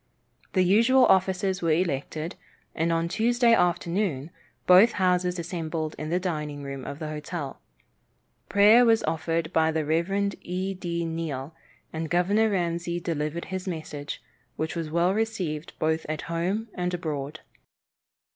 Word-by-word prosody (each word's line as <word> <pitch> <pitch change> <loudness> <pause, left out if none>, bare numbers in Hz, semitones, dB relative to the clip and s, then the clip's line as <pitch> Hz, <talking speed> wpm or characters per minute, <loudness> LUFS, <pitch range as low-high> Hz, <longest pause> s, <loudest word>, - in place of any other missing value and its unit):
The 185 - +4
usual 230 +8 +5
officers 190 0 +2
were 165 - 0
elected, 155 0 -2 0.4
and 165 +1 0
on 165 0 +1
Tuesday 235 +5 +3
afternoon 175 -5 0 0.3
both 190 +6 +7
houses 180 -1 +1
assembled 165 -2 -3
in 155 - -4
the 175 +2 +1
dining 150 -5 -3
room 135 -1 -6
of 140 - -6
the 155 -1 -5
hotel. 150 -1 -5 0.9
Prayer 210 +4 +7
was 225 -2 +4
offered 165 0 -1
by 160 0 +3
the 160 -1 -1
Rev. 195 +6 0
E. 185 +2 -3
D. 170 -2 -3
Neill, 160 -3 -4 0.4
and 160 0 -3
Governor 200 +6 +3
Ramsey 175 -2 -1
delivered 165 -1 -3
his 185 0 -4
message, 155 -4 -5 0.3
which 160 +2 -3
was 165 -2 -3
well 170 +3 +2
received 185 -8 -2
both 160 +1 0
at 155 -1 -2
home 185 +7 -2
and 180 0 -2
abroad. 155 -3 -4
170 Hz, 140 wpm, -26 LUFS, 155-190 Hz, 0.9 s, both